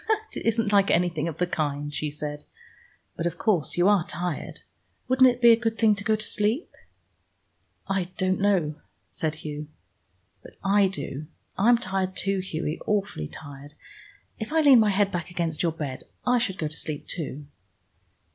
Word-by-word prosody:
"It - - -4
isn't 225 -2 +2
like 200 -1 +5
anything 170 -2 +2
of 160 -2 -5
the 180 - +1
kind," 145 -3 -2
she 150 0 -2
said. 150 0 -6 0.7
"But 170 - -1
of 170 0 -4
course 180 -8 0
you 175 +2 +4
are 205 -4 +4
tired. 175 0 -4 0.5
Wouldn't 260 +1 +6
it 245 0 -3
be 235 - +9
a - - +8
good 225 -1 -1
thing 220 -2 +5
to 205 0 -4
go 220 +1 +2
to 215 0 -3
sleep?" 215 - 0 1.2
"I 195 -2 0
don't 185 0 +1
know," 175 -7 +1 0.3
said 155 -1 -2
Hugh. 150 0 -5 0.7
"But - - -14
I 200 0 +4
do. 155 -6 -5 0.3
I'm 235 +5 +5
tired 190 -3 -2
too, 195 -1 +1
Hughie, 165 -4 -3
awfully 200 - -1
tired. 145 - -11 0.6
If 220 +5 -5
I 320 0 +3
leaned 275 -6 +7
my 215 - +3
head 200 0 +2
back 175 -2 -3
against 170 -3 -2
your 170 - +2
bed 145 -5 -5 0.2
I 250 0 +3
should 195 -5 -1
go 155 - -1
to 150 - -8
sleep 150 -1 -4
too." 150 -3 -5
185 Hz, 175 wpm, -26 LUFS, 155-210 Hz, 1.2 s, be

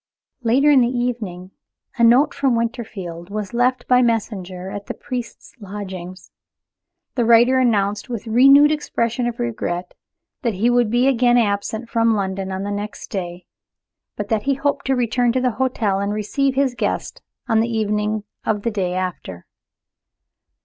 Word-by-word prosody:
Later 260 +5 +3
in 275 -3 +6
the 240 - +3
evening, 230 -7 -3 0.4
a 235 - +1
note 250 +6 +5
from 270 -4 +1
Winterfield 210 -7 -4
was 210 0 -5
left 245 +1 +1
by 250 0 +5
messenger 195 -6 -2
at 205 0 -7
the - - -5
priest's 245 -2 -7
lodgings. 190 -3 -8 0.8
The 245 - 0
writer 235 +3 +5
announced, 210 -2 +1
with 235 -3 -5
renewed 275 +6 +6
expressions 240 -5 -1
of 235 - -8
regret, 185 -7 -3 0.5
that 235 -7 -1
he 230 +6 +2
would 245 -2 +3
be 240 +3 +2
again 245 -2 +3
absent 220 +1 -1
from 230 -1 +2
London 190 -1 -3
on 190 +1 -3
the 205 - -3
next 205 +1 -6
day, 175 -2 -5 0.7
but 205 -1 -5
that 220 -2 +1
he 275 - +3
hoped 280 0 -1
to 265 - +2
return 245 0 +1
to 260 - +1
the 250 -1 +1
hotel 220 -7 0
and 200 +1 -1
receive 265 +6 0
his 270 -2 +1
guest - - -3 0.3
on 225 -2 +3
the 230 +1 +1
evening 210 -1 -1 0.2
of 210 -2 -1
the 230 - 0
day 185 -4 -2
after. 180 - -5
225 Hz, 165 wpm, -21 LUFS, 200-245 Hz, 0.8 s, in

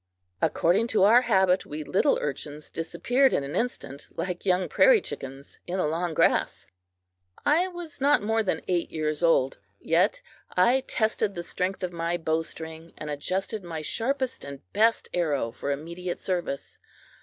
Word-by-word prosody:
According 185 +8 +2
to 220 -4 +2
our 230 +5 +7
habit, 190 -6 +3
we 150 +1 -6
little 195 - +2
urchins 150 +1 -5
disappeared 205 - +1
in - - +1
an 140 +4 -5
instant, 165 - -3
like 180 +1 -3
young 185 0 +2
prairie - - +5
chickens, 135 - -8
in 180 +2 -2
the 185 - +1
long 165 +2 -1
grass. - - +2 0.8
I 325 +5 +4
was 345 -6 -8
not 285 -4 +4
more 225 +1 +2
than 185 -6 -1
eight 175 -2 0
years 155 -1 -2
old, 135 -9 +3 0.2
yet 185 - +2 0.3
I 240 +9 +5
tested 220 -2 0
the 175 - -4
strength 185 +2 -2
of 180 -1 -2
my 170 +1 -1
bowstring 160 0 -4
and 150 -1 -5
adjusted 190 +7 -2
my 165 -3 -5
sharpest 260 - -1
and 140 -1 -8
best 225 +2 +3
arrow 145 -9 0
for 140 - -5
immediate 170 +5 -4
service. 175 -7 -3
175 Hz, 155 wpm, -27 LUFS, 155-220 Hz, 0.8 s, our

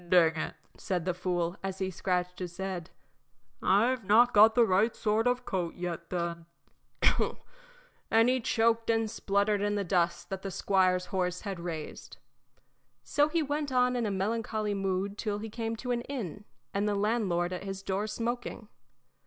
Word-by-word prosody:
"Dang 165 -3 +5
it!" 155 - -3 0.2
said 180 -3 -2
the 180 - +1
fool, 175 0 -1
as 190 -1 -4
he 190 0 -2
scratched 180 0 -1
his 175 -2 -6
head. 190 -3 -4 0.7
"I've 230 +5 +3
not 230 +5 +5
got 220 +2 +7
the 240 - +6
right 205 +4 +2
sort 220 +2 +1
of 250 0 0
coat 175 -3 -2
yet, 170 -1 -5
then." 170 -2 -3 1.6
And 225 +1 +5
he 255 +1 +3
choked 230 0 +1
and 225 -1 +1
spluttered 200 -1 +1
in 205 0 0
the 205 - 0
dust 170 -1 0
that 190 -1 -3
the 195 - -4
squire's 185 -1 +2
horse 180 -1 -2
had 195 -4 -5
raised. 165 -3 -6 0.9
So 290 - +3
on - - -4
he 330 0 +1
went 290 0 -2
in 250 -2 +2
a - - 0
melancholy 215 +1 -1
mood 195 +1 -2
till 210 -2 -1
he 215 +1 -6
came 225 0 -3
to 250 +2 -4
an 240 -1 0
inn, 210 - -6 0.3
and 200 +1 0
the 205 - 0
landlord 200 -5 0
at 180 - -5
his 195 0 -6
door 195 +3 -1
smoking. 230 0 -4
200 Hz, 170 wpm, -30 LUFS, 180-225 Hz, 1.6 s, got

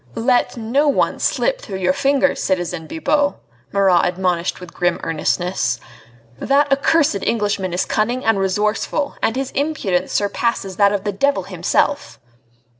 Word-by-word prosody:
"Let 245 +2 +1
no 245 +6 +1
one 285 - +1
slip - - 0
through 195 - -6
your 185 -1 +1
fingers, 280 +2 +1
citizen 175 -4 -2
Bibot," 295 - 0 0.4
Marat 190 -3 +3
admonished 180 -1 -1
with 180 -2 -11
grim 175 -1 0
earnestness. 155 -6 -1 0.6
"That 280 +1 +2
accursed 280 -5 +2
Englishman 205 -4 -1
is 175 - 0
cunning 240 +4 -1
and 225 -3 +3
resourceful, 210 +8 -1
and 225 - +1
his 265 0 -3
impudence 215 - -1
surpasses 205 -2 -1
that 200 -1 +4
of 200 -2 -2
the 205 - -1
devil 280 +8 +1
himself." 290 0 -1
210 Hz, 140 wpm, -19 LUFS, 185-275 Hz, 0.6 s, that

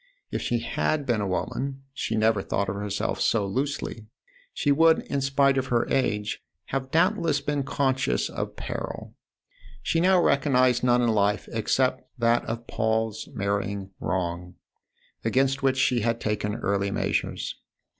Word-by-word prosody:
If - - -2
she 120 -1 0
had 120 - -1
been 120 -5 +1
a 100 - -1
woman 135 +8 -3
she 115 - -2
never 110 -2 +3
thought 100 0 -1
of 95 - -3
herself 100 0 -2
so 105 -3 +2
loosely 120 0 -3 0.4
she 145 - +1
would, 160 +3 +5
in 140 - -1
spite 135 0 +3
of 130 - -3
her 120 -2 +1
age, 105 -6 0 0.3
have 135 -1 -2
doubtless 165 -2 +2
been 145 0 -1
conscious 130 - 0
of - - -5
peril. - - -5 0.7
She 165 - +1
now 185 +1 +5
recognised 130 -6 +3
none 125 0 +4
in 120 - +3
life 105 -1 +1
except 125 +3 +1 0.2
that 115 0 +3
of 115 +1 -4
Paul's 110 -1 -1
marrying 100 0 -2
wrong, 90 0 -3 0.7
against 135 +4 +2
which 135 -1 +2
she 125 -2 +3
had 115 +1 0
taken 105 -1 -1
early 100 -3 0
measures. 100 - -2
120 Hz, 150 wpm, -26 LUFS, 105-135 Hz, 0.7 s, would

